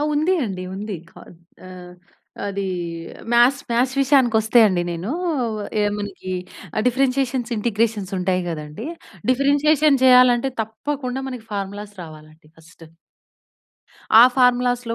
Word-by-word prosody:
ఆ! - - 0
ఉంది 310 +5 +1
అండి. 190 -4 -5
ఉంది. 205 +1 -5 0.2
కా - - -16 0.5
ఆహ్, 180 -1 -11 0.5
అదీ 200 0 -3 0.7
మ్యాథ్స్, 245 +4 +4
మ్యాథ్స్ 250 +2 +1
విషయానికొస్తే 240 -5 +3
అండీ 180 -3 0
నేనూ, 175 +8 -4 0.7
ఏముందీ 205 -2 -4 0.4
ఆ! - - -9
డిఫరెన్షియేషన్స్, 260 -1 0
ఇంటిగ్రేషన్స్ 215 -2 -1
ఉంటాయి 185 0 0
గదండీ. 155 - -7 0.4
డిఫరెన్షియేషన్ 285 +2 +3
జెయ్యాలంటే 250 0 +5
తప్పకుండా 255 +4 -5
మనకి 245 -4 -8
ఫార్ములాస్ 205 +1 -5
రావాలండి 155 -1 -14
ఫస్ట్. 165 +1 -17 1.4
ఆ - - +10
ఫార్ములాస్‌లో 245 -2 +2
230 Hz, 110 wpm, -21 LUFS, 195-260 Hz, 1.4 s, ఆ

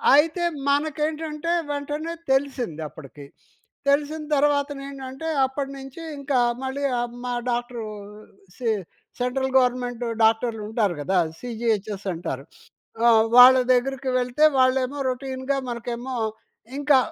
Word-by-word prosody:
అయితే 325 +4 +3 0.3
మనకేంటంటే 305 +2 -1 0.2
వెంటనే 295 +3 -3 0.2
తెలిసిందప్పటికి. 160 - -3 0.6
తెలిసిన 295 +2 +1
తర్వాతనేంటంటే 280 0 -1 0.2
అప్పటినుంచి 270 +2 -6 0.2
ఇంకా 280 -1 -1 0.3
మళ్ళీ 265 +2 -3 0.2
ఆ - - +1 0.2
మా 245 - -2 0.2
డాక్టరు 240 -1 -3 0.7
సె 245 -3 -2 0.5
సెంట్రల్ 260 +1 -1
గవర్నమెంట్ 245 -1 +1 0.2
డాక్టర్లు 225 0 +2
ఉంటారు 215 -5 0
కదా! 190 +6 0 0.2
సీజీహెచ్ఎస్ 220 -4 -2
అంటారు. 140 -5 -5 0.6
ఆ! - - +7 0.3
వాళ్ళ 255 +1 +10 0.2
దగ్గరకి 265 +1 0
వెళ్తే 250 +5 +2
వాళ్ళేమో 260 +1 +2
రోటీన్‌గా 260 +1 -2
మనకేమో, 240 +2 -4 0.6
ఇంకా 290 -1 +4
260 Hz, 100 wpm, -24 LUFS, 240-285 Hz, 0.7 s, వాళ్ళ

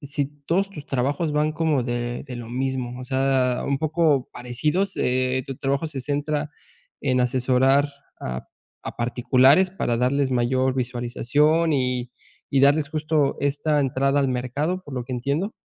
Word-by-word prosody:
si 145 -1 -2 0.2
todos 195 +4 +1
tus 150 -7 -9
trabajos 140 +5 -1
van 150 +1 +1
como 155 -4 +1
de 120 0 -3
de 125 -3 -7
lo 115 -1 -7
mismo. 130 -1 -3
O 125 - -6
sea, 130 -1 +1
un 140 -1 0
poco 155 -3 +1
parecidos. 150 +11 -1
Eh, 130 +1 0
¿tu 135 -2 -6
trabajo 140 +3 -1
se 140 -3 -5
centra 145 +2 -2 0.5
en 130 -2 +1
asesorar 130 +3 +3 0.3
a 65 0 -5 0.4
a - - -6
particulares 130 +8 +4
para 150 -10 -1
darles 130 +3 +1
mayor 130 +1 +1
visualización 130 +6 +1
y 125 -2 -1 0.4
y 135 - +3
darles 145 +1 +4
justo 155 -2 0
esta 145 +1 +1
entrada 135 +1 +1
al 135 - +1
mercado, 135 +9 -2
por 145 - -8
lo 125 -2 -3
que 130 - -7
entiendo? 140 - -1
135 Hz, 155 wpm, -23 LUFS, 125-150 Hz, 0.5 s, particulares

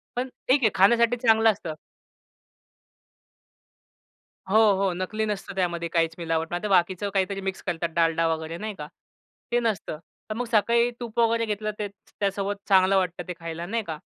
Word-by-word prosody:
पण 250 +2 -1 0.2
ठीक 270 +2 +4
आहे 220 - +6
खाण्यासाठी 235 +5 +5
चांगलं 225 0 +6
असतं. 195 -6 -6 2.8
हो, 200 - +1 0.3
हो. 190 -2 +1
नकली 185 +5 -2
नसतं 205 -2 -4
त्यामध्ये 170 -2 -1
काहीच 165 -1 +1
मिलावट. 165 -1 -1
नाहीतर 175 +4 -2
बाकीचं 185 +1 +2
काहीतरी 195 0 0
मिक्स 190 0 -4
करतात 170 -2 -2
डालडा 165 0 +2
वगैरे 160 +1 -5
नाही 215 +3 -5
का, 150 -5 -7 0.6
ते 240 - +3
नसतं. 215 -9 -2 0.3
तर - - -1
मग 245 - -2
सकाळी 235 +2 +3
तूप 235 -1 -5
वगैरे 230 0 +3
घेतलं 215 0 -2
तेच 205 -2 -3
तर - - -30
त्यासोबत 200 0 -1
चांगलं 190 0 +5
वाटतं 180 -1 -2
ते 180 - -3
खायला 165 0 -5
नाही 225 +4 -2
का 160 - -4
195 Hz, 165 wpm, -25 LUFS, 170-220 Hz, 2.8 s, आहे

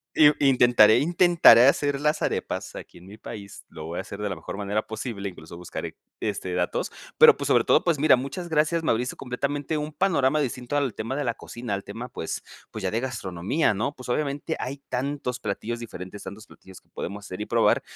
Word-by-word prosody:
I 150 -1 +7
intentaré 120 -5 +6
intentaré 170 -7 +6
hacer 140 0 +2
las 150 +1 +1
arepas - - -3
aquí - - -10
en 90 - -16
mi 105 +2 -12
país, 100 -3 -10
lo 80 - -9
voy 85 +2 -5
a - - -1
hacer 100 +1 -8
de 105 - -1
la 95 - -3
mejor 80 +4 -7
manera 105 +1 -2
posible, 110 -3 -5
incluso, 85 -2 -10
buscaré, 90 - -6 0.2
este 95 -4 -3
datos, 90 0 -1 0.3
pero - - +9
pues - - -4
sobre - - +4
todo, - - +4
pues 170 -3 +2
mira, 140 -1 +5
muchas 140 +8 -5
gracias, 160 +1 +1
me - - +2
abriste 120 +2 -1
completamente 140 +4 -3
un 150 +1 -4
panorama 155 -4 +2
distinto 125 0 -2
al 140 -5 0
tema 115 +5 -4
de 145 - -1
la 120 - 0
cocina, 120 -2 -6
al 100 - -3
tema, 115 +5 -7
pues 80 - -5 0.3
pues - - -7
ya - - 0
de 110 - 0
gastronomía, 105 - -1
¿no? 110 +9 -2
Pues, 125 - -11
obviamente 145 +4 -1
hay 130 +3 -4
tantos 130 -1 -3
platillos 115 +3 -4
diferentes, 105 -3 -8
tantos 110 +3 -9
platillos 95 -1 -15
que - - -38
podemos 100 +2 -6
hacer 90 +1 -7
y 105 - -4
probar - - +3
120 Hz, 210 wpm, -25 LUFS, 100-145 Hz, 0.3 s, pero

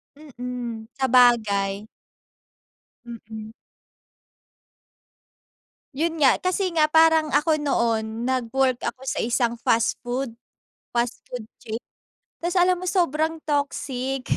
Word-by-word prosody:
Mm, 245 -5 -6
sabagay. 215 -6 +3 1.2
Mm. 220 -2 -9 2.4
Yun 320 +2 -1
nga, 265 - +5
kasi 370 0 0
nga, 310 -2 +3
parang 320 0 +5
ako 305 +1 +3
noon 230 -5 0
nag-work 255 0 +1
ako 260 - -5
sa 265 - -2
isang 235 0 0
fast 230 0 +1
food. 250 +1 -3 0.6
Fast 235 0 0
food 245 -2 -6 0.2
chain. 220 - -6 0.6
Tapos 345 +1 -2
alam 360 0 +4
mo 365 - -6
sobrang 325 -3 0
toxic 270 -3 -2
260 Hz, 100 wpm, -24 LUFS, 235-310 Hz, 2.4 s, nga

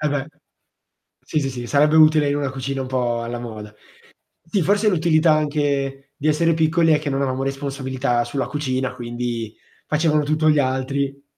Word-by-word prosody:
Eh, 150 - +1
beh. 145 -1 -2 1.0
Sì, 155 - -2
sì, 135 - -2
sì, 120 -2 -6
sarebbe 150 +2 +3
utile 155 -2 +5
in 145 - 0
una 140 -2 -2
cucina 135 0 -4
un 130 - -5
po' 120 -2 -1
alla 120 0 -5
moda. 105 -3 -8 0.7
Sì 195 +3 0
forse 205 +5 +2
l'utilità 160 -2 +3
anche 140 -2 -1
di 155 0 -3
essere 165 +2 +3
piccoli 160 0 +3
è 150 - +3
che 150 -1 -4
non 135 0 -1
avevamo 130 -1 -1
responsabilità 135 -3 -2
sulla 130 +3 -3
cucina, 130 -3 -2
quindi 120 -2 -4 0.3
facevano 150 -1 +2
tutto 155 +1 +1
gli 150 -1 +4
altri. 135 +1 -1
140 Hz, 175 wpm, -21 LUFS, 130-155 Hz, 1.0 s, utile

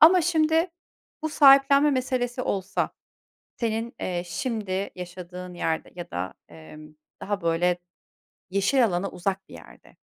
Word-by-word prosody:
Ama 345 +4 +8
şimdi 325 +1 +2 0.5
bu 315 - 0
sahiplenme 280 0 +6
meselesi 255 -1 -1
olsa 195 -3 -1 0.7
senin, 230 0 -2
eee, 175 -1 -2
şimdi 200 +1 -2
yaşadığın 180 0 -8
yerde 160 -2 -2
ya 175 - -7
da, 90 +1 -4
emm, 150 - -13 0.3
daha 205 0 -2
böyle 170 +2 +2 0.7
yeşil 200 +7 +3
alana 185 0 -1
uzak 190 +1 -3
bir - - -13
yerde - - -15
195 Hz, 125 wpm, -26 LUFS, 175-270 Hz, 0.7 s, Ama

